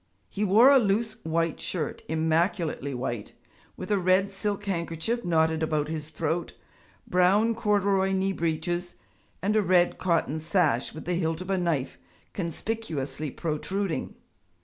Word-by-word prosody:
He 205 Hz, -, -3 dB
wore 220 Hz, +7 st, +7 dB
a 275 Hz, -, +7 dB
loose 220 Hz, +1 st, 0 dB
white 165 Hz, 0 st, -1 dB
shirt 160 Hz, -6 st, -3 dB
immaculately 160 Hz, -2 st, 0 dB
white 120 Hz, -4 st, -4 dB, 0.4 s
with -, -, -6 dB
a 205 Hz, -, +3 dB
red 185 Hz, +2 st, +3 dB
silk 205 Hz, +1 st, -3 dB
handkerchief 180 Hz, +5 st, -2 dB
knotted 160 Hz, -2 st, +2 dB
about 155 Hz, -1 st, 0 dB
his 155 Hz, -1 st, -4 dB
throat, 165 Hz, +2 st, -2 dB, 0.5 s
brown 195 Hz, +6 st, +3 dB
corduroy 200 Hz, -3 st, +2 dB
knee 190 Hz, 0 st, +1 dB
breeches, 175 Hz, +1 st, -2 dB, 0.5 s
and 205 Hz, +2 st, +1 dB
a 215 Hz, -, +5 dB
red 180 Hz, -2 st, +3 dB
cotton 165 Hz, -3 st, +1 dB
sash 160 Hz, -6 st, +1 dB
with 160 Hz, -, -8 dB
the 180 Hz, -, -1 dB
hilt 165 Hz, -2 st, -1 dB
of 185 Hz, +1 st, -5 dB
a 190 Hz, -, +2 dB
knife 145 Hz, -, -1 dB, 0.3 s
conspicuously 160 Hz, -6 st, -3 dB
protruding. 170 Hz, +5 st, -3 dB
175 Hz, 140 wpm, -27 LUFS, 160-195 Hz, 0.5 s, wore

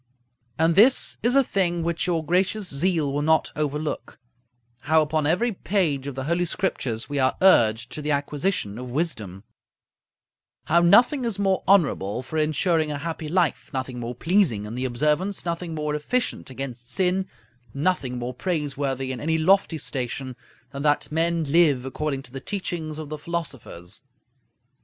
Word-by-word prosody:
And 165 Hz, +1 st, +3 dB
this 230 Hz, +9 st, +4 dB
is 245 Hz, +3 st, +2 dB
a 275 Hz, -, +6 dB
thing 175 Hz, -7 st, 0 dB
which 170 Hz, +1 st, -1 dB
your 165 Hz, -3 st, 0 dB
gracious 185 Hz, +4 st, +1 dB
zeal 155 Hz, -2 st, 0 dB
will 145 Hz, -, 0 dB
not 160 Hz, +1 st, +2 dB
overlook: 150 Hz, 0 st, -3 dB, 0.6 s
how 155 Hz, +4 st, +3 dB
upon 155 Hz, 0 st, 0 dB
every 185 Hz, +10 st, +2 dB
page 175 Hz, -9 st, -1 dB
of 140 Hz, -, -5 dB
the 135 Hz, -, -4 dB
Holy 170 Hz, +5 st, 0 dB
Scriptures 135 Hz, -11 st, -2 dB
we 145 Hz, -1 st, -2 dB
are 130 Hz, -1 st, +2 dB
urged 120 Hz, -, +4 dB
to 150 Hz, -, -5 dB
the 150 Hz, -, -3 dB
acquisition 145 Hz, -, -1 dB
of 125 Hz, 0 st, -7 dB
wisdom; 110 Hz, -, -3 dB, 1.2 s
how 170 Hz, +3 st, +3 dB
nothing 245 Hz, -, +5 dB
is 230 Hz, -4 st, -1 dB
more 195 Hz, -2 st, +1 dB
honorable 135 Hz, -, +2 dB
for 155 Hz, +5 st, -3 dB
insuring 155 Hz, +1 st, +1 dB
a 145 Hz, -, -3 dB
happy 160 Hz, +1 st, -5 dB
life, 175 Hz, -1 st, 0 dB
nothing 130 Hz, -1 st, -3 dB
more 120 Hz, +1 st, -5 dB
pleasing 160 Hz, -, +1 dB
in 105 Hz, -, -7 dB
the 125 Hz, +2 st, -2 dB
observance, 150 Hz, +11 st, 0 dB
nothing 170 Hz, -1 st, -3 dB
more 150 Hz, -1 st, -2 dB
efficient 195 Hz, -, -2 dB
against 125 Hz, -2 st, -7 dB
sin, 185 Hz, +5 st, 0 dB, 0.4 s
nothing 140 Hz, -3 st, -1 dB
more 120 Hz, +1 st, -4 dB
praiseworthy 140 Hz, -4 st, -2 dB
in 130 Hz, -, -5 dB
any 160 Hz, +1 st, 0 dB
lofty 180 Hz, 0 st, +3 dB
station, 130 Hz, -2 st, -4 dB, 0.4 s
than 140 Hz, 0 st, -6 dB
that 145 Hz, 0 st, +1 dB
men 165 Hz, +1 st, +1 dB
live 145 Hz, -4 st, +3 dB
according 135 Hz, 0 st, -3 dB
to 125 Hz, -, -10 dB
the 135 Hz, 0 st, -7 dB
teachings 165 Hz, -4 st, -4 dB
of 155 Hz, -2 st, -7 dB
the 155 Hz, -1 st, -5 dB
philosophers. 135 Hz, -, -6 dB
155 Hz, 160 wpm, -24 LUFS, 135-175 Hz, 1.2 s, a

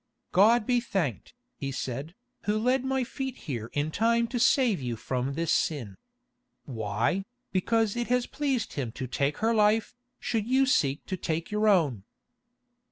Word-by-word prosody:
"God 215 Hz, +4 st, +5 dB
be 245 Hz, 0 st, +3 dB
thanked," 170 Hz, -, -3 dB, 0.2 s
he 135 Hz, -, -3 dB
said, 135 Hz, +6 st, -4 dB, 0.3 s
"Who 210 Hz, +1 st, +1 dB
led 250 Hz, +4 st, +2 dB
my 265 Hz, 0 st, 0 dB
feet 265 Hz, +1 st, -5 dB
here 120 Hz, -7 st, -4 dB
in 145 Hz, +2 st, -1 dB
time 230 Hz, +5 st, +2 dB
to 245 Hz, -, -2 dB
save 235 Hz, -, +3 dB
you 120 Hz, -2 st, -2 dB
from 130 Hz, +4 st, -2 dB
this 165 Hz, +1 st, +1 dB
sin. 120 Hz, -11 st, -1 dB, 0.7 s
Why, 115 Hz, -, -1 dB, 0.3 s
because 220 Hz, +3 st, +1 dB
it 240 Hz, 0 st, -2 dB
has 250 Hz, 0 st, +2 dB
pleased 270 Hz, -6 st, -2 dB
Him 130 Hz, -6 st, -3 dB
to 130 Hz, -, -4 dB
take 140 Hz, +3 st, -1 dB
her 230 Hz, -, +3 dB
life, 215 Hz, +2 st, +3 dB, 0.3 s
should 225 Hz, -2 st, -1 dB
you 265 Hz, +2 st, +4 dB
seek 145 Hz, -, +1 dB
to 190 Hz, -, -3 dB
take 165 Hz, +1 st, -3 dB
your 210 Hz, +1 st, +1 dB
own?" 150 Hz, -, +3 dB
195 Hz, 165 wpm, -28 LUFS, -, 0.7 s, God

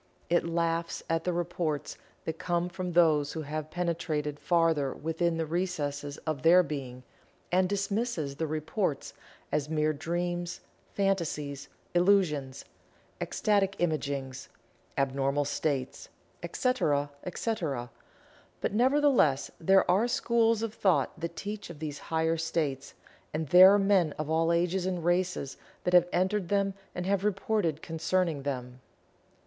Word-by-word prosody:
It 175 Hz, -1 st, +3 dB
laughs 170 Hz, 0 st, -1 dB
at 165 Hz, 0 st, 0 dB
the 180 Hz, -, +1 dB
reports 170 Hz, -3 st, -2 dB, 0.3 s
that 160 Hz, 0 st, -4 dB
come 175 Hz, 0 st, 0 dB
from 180 Hz, -1 st, -4 dB
those 155 Hz, -4 st, +4 dB
who 160 Hz, -, -4 dB
have 155 Hz, +1 st, -4 dB
penetrated 160 Hz, -4 st, -2 dB
farther 165 Hz, -6 st, +2 dB
within 165 Hz, +1 st, -1 dB
the 165 Hz, -, -1 dB
recesses 150 Hz, -4 st, -2 dB
of 155 Hz, -4 st, -2 dB
their 175 Hz, +5 st, +6 dB
being, 130 Hz, -5 st, -6 dB, 0.5 s
and 185 Hz, +1 st, +3 dB
dismisses 200 Hz, -, -2 dB
the 160 Hz, -, -1 dB
reports 155 Hz, 0 st, -2 dB, 0.4 s
as 150 Hz, 0 st, -1 dB
mere 155 Hz, -1 st, +1 dB
"dreams," 175 Hz, +3 st, -3 dB, 0.3 s
"fantasies," 160 Hz, -8 st, -1 dB, 0.2 s
"illusions," 175 Hz, -8 st, +2 dB, 0.6 s
"ecstatic 200 Hz, -3 st, +1 dB
imaginings," 140 Hz, -5 st, -2 dB, 0.5 s
"abnormal 140 Hz, +1 st, +1 dB
states," 140 Hz, -2 st, -2 dB, 0.3 s
etc., 145 Hz, -, 0 dB
etc. 165 Hz, -, -3 dB, 0.7 s
But, -, -, -2 dB
nevertheless, 250 Hz, -, +3 dB
there 190 Hz, +3 st, +4 dB
are 205 Hz, +6 st, +3 dB
schools 230 Hz, -2 st, +2 dB
of 225 Hz, -2 st, -3 dB
thought 190 Hz, -4 st, +1 dB
that 170 Hz, +1 st, -4 dB
teach 205 Hz, -1 st, -6 dB
of 170 Hz, -, -9 dB
these 150 Hz, -1 st, -5 dB
higher 160 Hz, 0 st, +1 dB
states, 155 Hz, -4 st, -2 dB, 0.4 s
and 155 Hz, -2 st, -2 dB
there 185 Hz, +2 st, +9 dB
are 205 Hz, -, +5 dB
men 195 Hz, -6 st, +3 dB
of 155 Hz, 0 st, -3 dB
all 165 Hz, +1 st, +2 dB
ages 175 Hz, +2 st, +1 dB
and 180 Hz, -3 st, -2 dB
races 175 Hz, -6 st, 0 dB, 0.3 s
that 180 Hz, -, 0 dB
have 175 Hz, 0 st, +6 dB
entered 185 Hz, 0 st, 0 dB
them 200 Hz, -1 st, +1 dB, 0.2 s
and 180 Hz, -, -3 dB
have 195 Hz, 0 st, +1 dB
reported 195 Hz, -5 st, 0 dB
concerning 165 Hz, -1 st, 0 dB
them. 125 Hz, -2 st, -5 dB
165 Hz, 130 wpm, -29 LUFS, 150-185 Hz, 0.7 s, there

